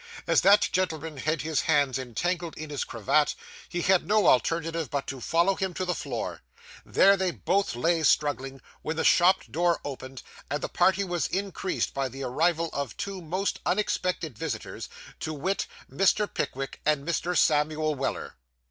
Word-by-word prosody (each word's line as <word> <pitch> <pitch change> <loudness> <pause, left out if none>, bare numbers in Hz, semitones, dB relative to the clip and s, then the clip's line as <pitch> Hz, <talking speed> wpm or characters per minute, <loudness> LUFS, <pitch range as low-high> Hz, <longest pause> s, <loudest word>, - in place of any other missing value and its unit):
As - - +4
that 200 +2 +6
gentleman 160 -4 -2
had 155 +4 -1
his 155 -3 0
hands 145 -4 +2
entangled 170 +8 -3
in 155 -1 -7
his 145 - -2
cravat, 120 +6 +1 0.3
he 175 -1 -2
had 190 -1 +3
no 210 -1 +3
alternative 165 +2 +2
but 140 -1 -2
to 135 -2 -6
follow 170 +9 +2
him 190 -2 -3
to 185 - -2
the 180 - 0
floor. - - -4 0.4
There 195 +1 +5
they 190 -1 0
both 185 -1 0
lay 165 +6 +1
struggling, 135 -3 +1 0.2
when 160 - -3
the 160 - -1
shop 180 +2 +5
door 170 +1 +2
opened, 130 -2 -7 0.3
and 145 +2 -2
the - - -2
party 190 +2 +3
was 175 -5 -1
increased 195 -1 -2
by 135 -1 -1
the 135 +2 -7
arrival 165 +5 +1
of 140 -5 -4
two 195 -2 -4
most 185 +5 -2
unexpected 180 - -1
visitors, 140 -9 -5 0.3
to 155 - -3
wit, 185 +7 -1 0.2
Mr. 200 +2 +2
Pickwick 135 -6 -4
and 150 -1 +1
Mr. 175 +1 0
Samuel 155 0 +2
Weller. 135 -1 -4
160 Hz, 165 wpm, -27 LUFS, 140-180 Hz, 0.4 s, that